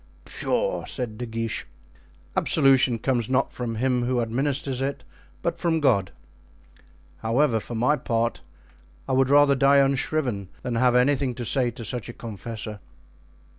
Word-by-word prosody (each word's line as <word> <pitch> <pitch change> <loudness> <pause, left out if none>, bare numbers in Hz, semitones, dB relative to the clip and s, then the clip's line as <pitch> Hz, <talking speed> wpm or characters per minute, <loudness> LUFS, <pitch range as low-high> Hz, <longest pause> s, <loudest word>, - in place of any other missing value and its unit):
"Pshaw!" - - -1
said 120 -4 -5
De 120 - -4
Guiche. 115 -1 -3 0.7
"Absolution 135 -3 +4
comes 120 -1 -1
not 130 +1 +1
from 120 -2 -4
him 125 +2 +1
who 125 0 0
administers 135 +3 -1
it, 140 +1 -3 0.4
but - - -1
from 165 -2 +1
God. 105 - +2 1.1
However, 115 +1 +1
for 120 - -7
my 125 +7 +2
part, 115 -2 -1 0.7
I - - -3
would 130 0 +3
rather 145 0 +6
die 140 +1 +4
unshriven 135 -6 +1 0.2
than 125 - -3
have 125 +1 +3
anything 130 0 +2
to 120 - -5
say 125 0 +2
to 120 0 -8
such 120 +1 -4
a - - -6
confessor. 110 -1 -7
125 Hz, 145 wpm, -25 LUFS, 115-135 Hz, 1.1 s, rather